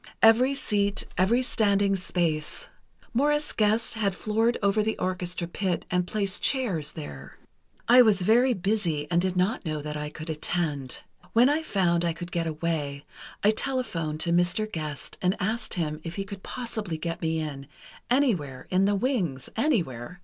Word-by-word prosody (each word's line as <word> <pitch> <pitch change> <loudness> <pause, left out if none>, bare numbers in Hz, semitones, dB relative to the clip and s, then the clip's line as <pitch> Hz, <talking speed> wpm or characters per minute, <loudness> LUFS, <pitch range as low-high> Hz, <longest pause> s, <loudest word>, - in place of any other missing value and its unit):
Every 245 +5 +6
seat, 205 -6 0
every 225 +8 +3
standing 200 -4 +2
space... 170 -4 -2 0.4
Morris 295 +4 +2
Gest 220 +1 +1
had 205 -4 0
floored 225 +4 +1
over 200 +2 +3
the 220 +1 -1
orchestra 180 -1 -2
pit 180 0 -2
and 180 0 +1
placed 200 -1 -1
chairs 190 - 0
there. 70 - -9 0.5
"I 245 +2 +8
was 210 -6 +4
very 240 +5 +4
busy, 185 -6 0
and 175 0 +3
did 185 0 -1
not 185 +4 +1
know 155 -3 -2
that 150 0 -4
I 150 0 -4
could 155 +2 -6
attend. 150 -4 -2 0.3
When 240 +4 +6
I 300 +2 +2
found 175 - +1
I 170 -1 +1
could 175 +1 -8
get 170 -1 -1
away, 155 -3 -2 0.4
I 210 - +6
telephoned 215 - -2
to 170 - +1
Mr. 175 +4 +2
Gest 155 -4 -4
and 185 +1 +2
asked 220 +4 -2
him 155 -3 -2
if 165 0 -6
he 195 - -2
could 195 -1 -9
possibly 220 -9 -3
get 165 +1 -4
me 160 0 0
in, 140 -3 -5 0.4
anywhere—in 185 - +1
the 205 0 +2
wings—anywhere. 180 - -1
185 Hz, 160 wpm, -27 LUFS, 160-220 Hz, 0.5 s, I